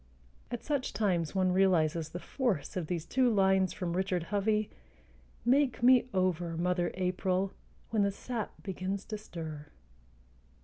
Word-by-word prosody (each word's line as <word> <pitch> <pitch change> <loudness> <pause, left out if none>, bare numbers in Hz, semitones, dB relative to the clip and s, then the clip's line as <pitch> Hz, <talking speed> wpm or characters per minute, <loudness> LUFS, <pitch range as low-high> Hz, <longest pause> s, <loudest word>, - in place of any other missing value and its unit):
At 240 -1 -5
such 285 -3 -1
times 180 -6 0
one 185 -1 +3
realizes 170 -4 +2
the 175 - -6
force 210 - -2
of 175 -4 -2
these 170 -1 -2
two 255 +6 +2
lines 190 -2 +3
from 175 -4 -3
Richard 185 -2 0
Hovey: 210 +1 +1 0.7
Make 260 -1 +3
me 250 0 +6
over, 180 -3 0
Mother 175 0 +1
April, 185 +1 0 0.4
When 220 -2 +2
the 200 - +3
sap 225 +3 -4
begins 190 +1 -3
to 215 -1 -5
stir. 155 -7 -7
190 Hz, 140 wpm, -31 LUFS, 175-215 Hz, 0.7 s, me